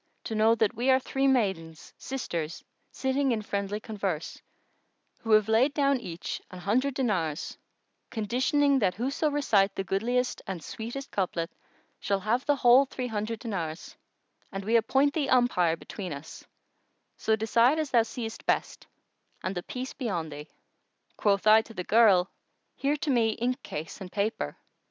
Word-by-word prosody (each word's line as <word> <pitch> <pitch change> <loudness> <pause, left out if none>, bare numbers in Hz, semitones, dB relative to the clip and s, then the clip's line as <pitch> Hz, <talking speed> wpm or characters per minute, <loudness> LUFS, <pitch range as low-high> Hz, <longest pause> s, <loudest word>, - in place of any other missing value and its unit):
to - - -5
know 220 +1 +4
that 220 -2 +1
we 240 +3 -1
are 260 0 +6
three 270 +1 0
maidens, 190 -11 -1
sisters, 170 -12 -4 0.3
sitting 265 0 0
in 230 - +1
friendly 200 0 -2
converse, 195 -7 -4 0.8
who 225 - -8
have 215 -1 +5
laid 245 +6 +3
down 275 -2 +2
each 175 -7 -6
an 185 - -10
hundred 245 +9 0
dinars, 180 - -1 0.5
conditioning 260 +5 +2
that 185 -6 +1
whoso 275 - 0
recite 215 -9 +2
the 195 - -2
goodliest 245 +6 -1
and 180 -5 -5
sweetest 240 - -6
couplet 180 -3 -2 0.5
shall 200 -1 -1
have 230 +6 0
the 290 - +4
whole 260 +1 +6
three 255 -1 -4
hundred 220 -1 -3
dinars; 175 -9 -5 0.6
and 195 -1 -5
we 225 +2 +2
appoint 270 +5 +3
thee 290 -4 -1
umpire 235 -10 +3
between 185 +2 -7
us: 145 +1 -8 0.7
so 220 - +1
decide 230 +6 +3
as 310 -3 -2
thou 235 - +5
seest 225 0 -6
best, - - -1 0.6
and 185 - -2
the 175 - -3
Peace 255 +7 -6
be 255 -4 -4
on 165 -5 -2
thee! 150 +1 -8 0.7
Quoth 200 -1 +1
I 215 +1 +7
to 225 0 -14
the 180 - -3
girl, 200 -4 +4 0.4
Here 285 +2 0
to 285 - -1
me 225 -3 +2
inkcase 235 - -4
and 185 -1 -7
paper. 200 - -2
220 Hz, 160 wpm, -28 LUFS, 195-255 Hz, 0.8 s, I